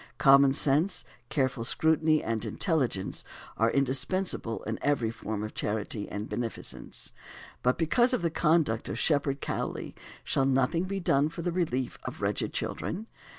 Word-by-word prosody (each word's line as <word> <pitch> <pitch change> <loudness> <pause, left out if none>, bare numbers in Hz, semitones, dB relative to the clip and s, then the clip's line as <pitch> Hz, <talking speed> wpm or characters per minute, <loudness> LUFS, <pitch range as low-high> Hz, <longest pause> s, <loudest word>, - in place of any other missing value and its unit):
Common 140 0 +6
sense, 150 +6 +2 0.2
careful 130 -4 0
scrutiny, 155 +4 +3
and 115 -1 -2
intelligence, 120 - -1 0.3
are 115 +1 +3
indispensable 135 - 0
in 110 0 -4
every 130 -6 +1
form 110 -2 -4
of 110 - -5
charity 105 0 -3
and 105 +2 -4
beneficence. 120 -2 -3 0.5
But 125 +1 +2
because 240 - +3
of 250 -9 0
the 170 - +1
conduct 155 -9 +2
of 95 - -3
Shepherd 140 0 +1
Cowley - - -3 0.3
shall 135 - +1
nothing 135 +6 +2
be 195 +1 -3
done 145 -4 +2
for 165 +1 -7
the 175 - 0
relief 130 -8 -1
of - - -6
wretched - - -1
children? 200 +6 -3
135 Hz, 150 wpm, -29 LUFS, 115-160 Hz, 0.5 s, Common